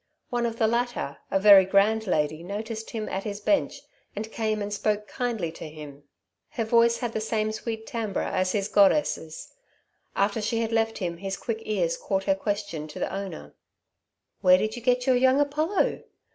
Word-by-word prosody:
One 240 -1 +1
of 230 0 -5
the 225 - +2
latter, 235 - -1
a 195 - +2
very 200 -1 +8
grand 205 +3 +2
lady, 155 -2 0
noticed 215 +4 -5
him 220 -2 -4
at 190 +1 -3
his 205 -1 -5
bench 295 +8 0 0.3
and 220 +2 -5
came 215 -1 -1
and 205 0 -3
spoke 210 0 -1
kindly 225 -9 -2
to 160 - -9
him. 145 -2 -11 0.4
Her 255 -7 -2
voice 235 +1 +4
had 240 -3 -3
the 220 - -2
same 215 0 -1
sweet 220 0 -5
timbre 225 -7 -3
as 185 0 0
his 200 -1 0
goddess's. 200 - +1 0.6
After 205 +2 +1
she 225 +2 0
had 225 0 -2
left 225 0 +1
him 170 -3 -3
his 195 +2 -4
quick 225 -2 -3
ears 180 -6 0
caught 195 -1 -2
her 195 - +3
question 200 -5 -3
to 150 - -10
the - - -3
Owner: 195 -1 -6 0.9
"Where 185 -1 +7
did 215 +3 -2
you 240 - -7
get 250 +1 +2
your 260 - +4
young 260 +2 +4
Apollo? 305 +7 +1
215 Hz, 185 wpm, -26 LUFS, 195-230 Hz, 0.9 s, very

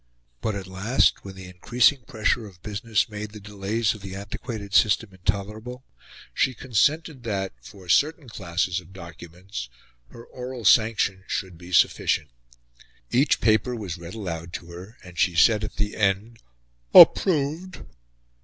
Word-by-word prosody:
But, 110 - -2
at 95 -2 -5
last, 95 +7 +1
when 95 -1 -9
the 95 0 -10
increasing 120 +9 +2
pressure 110 0 -1
of 90 -3 -17
business 105 +1 -1
made 105 -1 -7
the 105 - -9
delays 105 +2 -2
of 105 - -12
the 95 -1 -7
antiquated 100 +1 -7
system 110 +1 +3
intolerable, 105 +7 -4 0.5
she 130 - +1
consented 140 +5 0
that, 100 -5 -3
for 90 +9 -14
certain 150 - +2
classes 90 -4 -2
of 90 +1 -16
documents, 85 -5 -9 0.4
her 115 0 -13
oral 125 -2 -8
sanction 105 -3 +3
should 95 -2 -4
be 85 +2 -13
sufficient. 75 -4 +2 0.8
Each 135 +5 +3
paper 110 +3 +2
was 95 -7 -6
read 85 +4 -9
aloud 85 -5 -6
to 85 0 -7
her, 95 +7 -11
and 90 -2 -11
she 95 -4 +2
said 105 +5 +4
at 105 - -5
the 105 0 -2
end 105 +3 0 0.6
"Approved." 165 +2 +5
105 Hz, 145 wpm, -24 LUFS, 95-115 Hz, 0.8 s, Approved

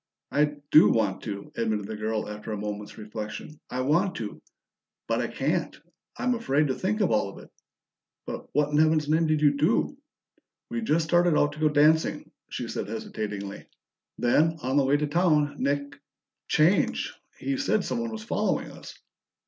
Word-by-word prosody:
"I 150 0 +2 0.2
do 155 - +8
want 105 -4 +1
to," 100 -2 -6
admitted 110 -3 -1
the 110 +1 -5
girl 110 0 -2
after 105 +1 -7
a 105 - -2
moment's 105 0 -5
reflection. 110 +7 -7
"I 125 - -2
want 170 +9 +2
to - - -6 0.6
but - - 0
I - - -1
can't. - - -2 0.4
I'm 250 - +1
afraid 150 - +1
to - - +2
think 210 - -1
of 195 - +2
all 105 -2 +2
of - - -12
it." - - -13 0.7
"But - - -6
what 150 +1 +1
in 150 - +2
Heaven's 155 -1 +3
name 160 +2 +2
did 155 -1 +1
you 145 -1 +4
do?" 155 - +1 0.8
"We 235 - -2
just 165 -7 +1
started 175 -1 +3
out 145 - +3
to 155 - -10
go 155 -1 +3
dancing," 155 +2 +3 0.2
she - - -4
said - - -4
hesitatingly. 105 -2 -5 0.5
"Then, 155 +7 +3
on 130 +1 0
the 140 -2 +4
way 140 +2 +3
to 150 - 0
town, 150 -2 +2
Nick 140 +1 -2 0.5
changed. 165 +6 +2 0.3
He 275 - -2
said 215 -7 +1
someone 235 -1 -2
was 220 -1 -6
following 220 - -1
us." - - -11
145 Hz, 175 wpm, -27 LUFS, 110-160 Hz, 0.8 s, do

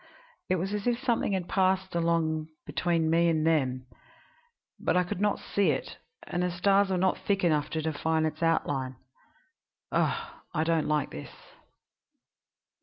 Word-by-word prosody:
It 185 - +3
was 190 +3 -2
as 210 +2 -2
if 240 -1 +2
something 240 -5 0
had 185 -2 -1
passed 190 0 +1
along 165 -2 +1 0.2
between 165 -2 0
me 170 +1 +4
and 160 -1 +1
them; 130 -6 +1 0.9
but - - +1
I 180 - +4
could 180 +1 -4
not 210 -1 +2
see 200 -1 0
it, - - -3 0.2
and 175 - -3
the 180 - +1
stars 195 +3 +3
were 190 - +1
not 185 +1 +1
thick 195 -2 0
enough 150 -3 +2
to 160 -1 -2
define 160 +1 0
its 155 - -3
outline. 140 -5 0 1.0
Ugh! - - 0 0.2
I 155 - +2
don't 165 -1 +1
like 150 -2 0
this. 75 - -7
170 Hz, 160 wpm, -28 LUFS, 155-190 Hz, 1.0 s, me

